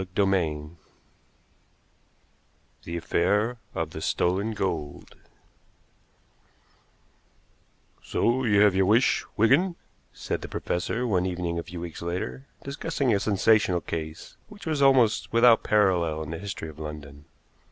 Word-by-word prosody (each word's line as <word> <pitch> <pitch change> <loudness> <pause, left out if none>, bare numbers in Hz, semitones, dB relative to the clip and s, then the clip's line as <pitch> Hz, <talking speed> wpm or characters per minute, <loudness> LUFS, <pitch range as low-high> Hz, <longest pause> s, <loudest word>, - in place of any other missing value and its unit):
CHAPTER 95 +2 0
XII 75 -5 -1 2.2
THE 85 +1 -4
AFFAIR 105 +8 0 0.2
OF 80 -3 -2
THE 80 - -7
STOLEN 95 +8 0
GOLD 85 -8 -4 2.9
"So 125 +3 0
you 105 -4 +3
have 105 -2 +5
your 95 0 +2
wish, 115 +5 +3
Wigan," 150 - +3 0.4
said - - -4
the - - -6
professor, 115 +8 -2
one 95 -6 +1
evening 85 -2 -3
a - - -4
few 90 +1 -8
weeks 85 -1 -7
later, 90 +10 -4 0.2
discussing 140 -2 -1
a 100 - +2
sensational 100 -2 +2
case 80 -1 -6
which 210 -1 -12
was 155 -3 -1
almost 130 -5 +4
without 115 0 +5
parallel 90 -7 +2
in 75 - -7
the 85 - -5
history 95 -5 -6
of 75 0 -13
London. 75 -2 -8
95 Hz, 125 wpm, -26 LUFS, 85-115 Hz, 2.9 s, have